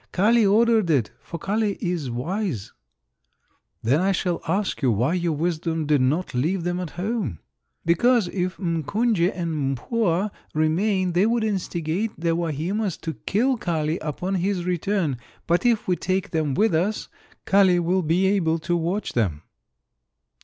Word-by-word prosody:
"Kali 225 Hz, +5 st, +4 dB
ordered 220 Hz, -1 st, +4 dB
it, 135 Hz, -9 st, +2 dB
for 170 Hz, -, -7 dB
Kali 205 Hz, +3 st, -1 dB
is 175 Hz, -7 st, -2 dB
wise." 130 Hz, -, -3 dB, 1.1 s
"Then 130 Hz, +7 st, +3 dB
I 195 Hz, +1 st, +2 dB
shall 180 Hz, -2 st, -1 dB
ask 190 Hz, +3 st, -1 dB
you 130 Hz, -4 st, +3 dB
why 120 Hz, -, +1 dB
your 175 Hz, -2 st, 0 dB
wisdom 165 Hz, 0 st, -1 dB
did 145 Hz, -2 st, +3 dB
not 150 Hz, +8 st, 0 dB
leave 165 Hz, +9 st, 0 dB
them 175 Hz, +1 st, -1 dB
at 180 Hz, -3 st, -4 dB
home?" 190 Hz, -, -2 dB, 0.5 s
"Because 220 Hz, +5 st, +3 dB
if 185 Hz, 0 st, -2 dB
M'Kunje 180 Hz, -, +1 dB
and 155 Hz, -6 st, -2 dB
M'Pua 205 Hz, -, 0 dB, 0.2 s
remain 185 Hz, +4 st, +1 dB
they 180 Hz, +5 st, +3 dB
would 230 Hz, 0 st, +1 dB
instigate 190 Hz, -1 st, -2 dB
the 165 Hz, 0 st, +1 dB
Wahimas 175 Hz, +5 st, -2 dB
to 160 Hz, -, -3 dB
kill 245 Hz, +10 st, 0 dB
Kali 160 Hz, -4 st, -1 dB
upon 170 Hz, +5 st, -3 dB
his 185 Hz, -1 st, 0 dB
return, 180 Hz, -5 st, 0 dB, 0.3 s
but 175 Hz, +8 st, +2 dB
if 230 Hz, -3 st, +1 dB
we 180 Hz, -, +2 dB
take 185 Hz, +2 st, -2 dB
them 155 Hz, -5 st, 0 dB
with 215 Hz, -3 st, +2 dB
us 185 Hz, +7 st, 0 dB, 0.4 s
Kali 190 Hz, -3 st, +4 dB
will 180 Hz, +2 st, +1 dB
be 170 Hz, +3 st, +2 dB
able 185 Hz, -5 st, +2 dB
to 175 Hz, +2 st, -1 dB
watch 175 Hz, +5 st, -2 dB
them." 90 Hz, -10 st, 0 dB
175 Hz, 155 wpm, -24 LUFS, 160-200 Hz, 1.1 s, Kali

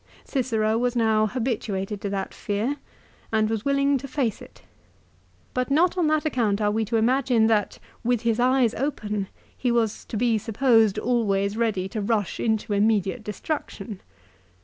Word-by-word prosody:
Cicero 225 Hz, -4 st, 0 dB
was 245 Hz, 0 st, 0 dB
now 220 Hz, -2 st, +3 dB
habituated 210 Hz, -4 st, -3 dB
to 200 Hz, -, -2 dB
that 195 Hz, -1 st, -3 dB
fear, 220 Hz, +8 st, -2 dB, 0.5 s
and 220 Hz, -1 st, +2 dB
was 220 Hz, -2 st, -2 dB
willing 280 Hz, 0 st, +2 dB
to 275 Hz, -, -7 dB
face 255 Hz, -5 st, -1 dB
it. -, -, -14 dB, 0.9 s
But 255 Hz, +1 st, -1 dB
not 335 Hz, +6 st, +3 dB
on 350 Hz, -4 st, +2 dB
that 310 Hz, 0 st, +1 dB
account 230 Hz, -9 st, +1 dB
are 210 Hz, -1 st, +2 dB
we 220 Hz, +1 st, 0 dB
to 225 Hz, +2 st, 0 dB
imagine 245 Hz, 0 st, +3 dB
that, 215 Hz, -3 st, +1 dB, 0.3 s
with 240 Hz, -1 st, +1 dB
his 230 Hz, -1 st, 0 dB
eyes 250 Hz, -1 st, +3 dB
open, 210 Hz, -7 st, -2 dB, 0.3 s
he 250 Hz, -, 0 dB
was 230 Hz, -3 st, 0 dB
to 220 Hz, -, -5 dB
be 230 Hz, -1 st, +2 dB
supposed 225 Hz, -1 st, +3 dB
always 205 Hz, -4 st, +1 dB
ready 220 Hz, -5 st, 0 dB
to 215 Hz, -, -3 dB
rush 205 Hz, -2 st, -1 dB
into 220 Hz, -2 st, 0 dB
immediate 210 Hz, +1 st, +1 dB
destruction. 210 Hz, -2 st, -5 dB
225 Hz, 160 wpm, -25 LUFS, 210-250 Hz, 0.9 s, now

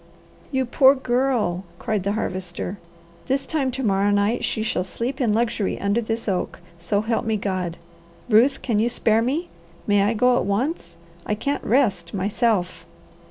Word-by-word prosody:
"You 265 Hz, -2 st, +1 dB
poor 265 Hz, +3 st, +5 dB
Girl!" 245 Hz, -8 st, 0 dB
cried 215 Hz, -2 st, -1 dB
the 200 Hz, +2 st, -1 dB
Harvester. 185 Hz, -2 st, -3 dB, 0.5 s
"This 275 Hz, +1 st, 0 dB
time 290 Hz, -5 st, 0 dB
to 260 Hz, +1 st, -4 dB
morrow 200 Hz, 0 st, +2 dB
night 205 Hz, +3 st, +1 dB
she 220 Hz, -, -1 dB
shall 215 Hz, -5 st, -1 dB
sleep 245 Hz, +9 st, -4 dB
in 235 Hz, -4 st, +2 dB
luxury 225 Hz, -2 st, 0 dB
under 200 Hz, +4 st, +1 dB
this 225 Hz, 0 st, -3 dB
oak, 190 Hz, -3 st, -2 dB, 0.2 s
so 200 Hz, +4 st, 0 dB
help 225 Hz, +1 st, -1 dB
me 220 Hz, -2 st, 0 dB
God! 185 Hz, -4 st, -3 dB, 0.5 s
Ruth, 250 Hz, +4 st, +4 dB
can 225 Hz, -5 st, +1 dB
you 230 Hz, +2 st, +2 dB
spare 225 Hz, -2 st, +2 dB
me? 295 Hz, +9 st, -1 dB, 0.4 s
May 205 Hz, -1 st, +3 dB
I 210 Hz, +3 st, +2 dB
go 250 Hz, +3 st, +4 dB
at -, -, 0 dB
once? 200 Hz, -, -2 dB, 0.3 s
I 210 Hz, -, 0 dB
can't 280 Hz, +7 st, -2 dB
rest, 205 Hz, -8 st, +1 dB
myself." 200 Hz, -1 st, 0 dB
220 Hz, 165 wpm, -23 LUFS, 200-250 Hz, 0.5 s, poor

